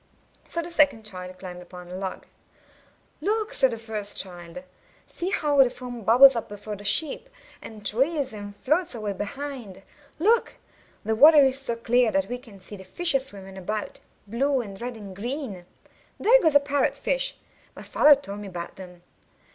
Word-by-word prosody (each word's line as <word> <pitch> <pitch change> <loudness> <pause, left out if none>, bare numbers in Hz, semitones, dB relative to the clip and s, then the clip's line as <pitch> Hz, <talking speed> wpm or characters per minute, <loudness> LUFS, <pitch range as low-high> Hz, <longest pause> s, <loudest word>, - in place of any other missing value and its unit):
So 335 - -2
the 345 - -8
second 290 -9 +3
child 185 -3 -5
climbed 180 -1 -9
upon 180 0 -12
the 180 - -8
log. 190 0 -6 1.0
''Look!" 435 +3 -1
said 265 - +6
the 230 - -5
first 215 -2 -5
child. 175 +5 -2 0.4
''See 355 - -5
how 290 -5 +3
the 255 - 0
foam 245 -1 -9
bubbles 250 +5 +7
up 230 - -4
before 205 +1 -7
the 205 - -12
ship, 305 - +1 0.3
and 215 -2 -11
trails 270 +2 +2
and 205 -1 -9
floats 305 - 0
away 210 -3 -4
behind! 215 -1 -7 0.3
Look! 445 +8 +2 0.5
the 220 - 0
water 295 +5 +7
is 265 0 +1
so 235 -3 -3
clear 235 0 +2
that 195 +1 0
we 245 0 -4
can 225 -6 -16
see 190 +3 -11
the 190 - -11
fishes 270 - -1
swimming 195 -4 -11
about, 210 +3 -5 0.3
blue 265 +6 0
and 200 -3 -10
red 245 -1 -5
and 200 -3 -10
green. 220 - -5 0.5
There - - +5
goes 315 -6 +2
a - - +9
parrot 285 0 0
fish; - - 0 0.4
my - - -10
father 295 -1 +5
told 205 -8 -9
me 205 - -8
about 175 -2 -8
them. 180 -2 -12
230 Hz, 180 wpm, -25 LUFS, 200-285 Hz, 1.0 s, a